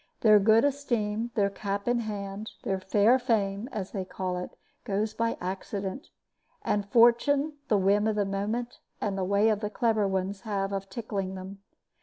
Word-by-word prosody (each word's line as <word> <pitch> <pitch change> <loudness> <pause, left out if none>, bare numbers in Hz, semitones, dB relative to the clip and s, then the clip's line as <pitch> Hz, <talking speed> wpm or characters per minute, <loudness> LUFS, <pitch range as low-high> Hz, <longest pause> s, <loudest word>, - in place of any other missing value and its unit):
Their 215 -2 +7
good 220 +5 +5
esteem, 235 -6 -1
their 200 -3 +2
cap 200 +1 -4
in 240 0 +2
hand, 205 -1 -5
their 190 -1 -1
fair 205 +6 +4
fame, 220 -2 0
as 195 -3 -4
they 195 -3 -3
call 185 0 -4
it, 180 - -5 0.3
goes 210 +2 -1
by 230 +1 -1
accident, 195 - -4 0.6
and 205 -1 -1
fortune, 275 +7 +4
the 210 - +3
whim 200 +2 +3
of 220 - +1
the 205 -1 +1
moment, 215 +5 -3 0.2
and 205 -2 -1
the 190 - -1
way 200 +4 +3
the 210 0 -3
clever 220 -2 +1
ones 190 +1 -2
have 200 -3 -2
of 195 0 -4
tickling 195 -3 -4
them. 190 +1 -8
205 Hz, 170 wpm, -28 LUFS, 195-225 Hz, 0.6 s, Their